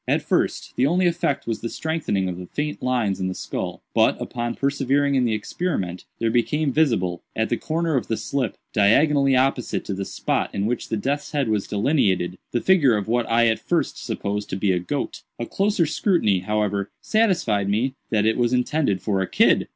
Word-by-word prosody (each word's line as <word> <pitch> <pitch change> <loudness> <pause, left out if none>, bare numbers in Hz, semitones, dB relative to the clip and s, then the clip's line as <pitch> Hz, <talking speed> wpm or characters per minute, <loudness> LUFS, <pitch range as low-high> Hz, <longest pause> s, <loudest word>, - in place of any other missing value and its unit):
At - - +1
first, - - 0
the 130 - +3
only 180 +4 +2
effect 170 -5 0
was 115 -1 -3
the 115 - -3
strengthening 155 - -1
of 90 -1 -4
the 90 - -8
faint 150 +7 -3
lines 120 -6 0
in 95 - -1
the 95 - -3
skull; - - -5
but, - - +3
upon 120 0 -3
persevering 140 0 +1
in 130 -2 +3
the 110 -2 +1
experiment, 105 - -3
there 115 -1 0
became 140 +5 +1
visible, 95 - +1
at 110 - 0
the - - +2
corner 165 0 -1
of 130 - 0
the 115 - -1
slip, 135 -5 -2 0.2
diagonally 135 +6 +4
opposite 130 -1 0
to 100 - -3
the 100 +1 -3
spot - - -2
in 100 0 0
which 120 +2 -2
the 110 - -1
death's 140 +8 -2
head 140 -5 0
was 105 -2 0
delineated, 100 - +1
the 120 - 0
figure 150 - +4
of 105 - -4
what 120 +1 0
I 115 +1 +4
at 110 -1 +2
first - - -1
supposed 105 +1 -3
to - - -2
be 95 0 +1
a 90 - +1
goat. 90 - -4 0.2
A 120 - -3
closer 195 - +1
scrutiny, 155 - +2
however, 100 0 -1
satisfied 170 - +1
me 120 +6 +1 0.2
that 105 -2 +1
it 110 - +2
was 120 0 +1
intended 125 - +1
for 100 -3 0
a 95 - -1
kid." - - +3
120 Hz, 205 wpm, -23 LUFS, 100-145 Hz, 0.2 s, diagonally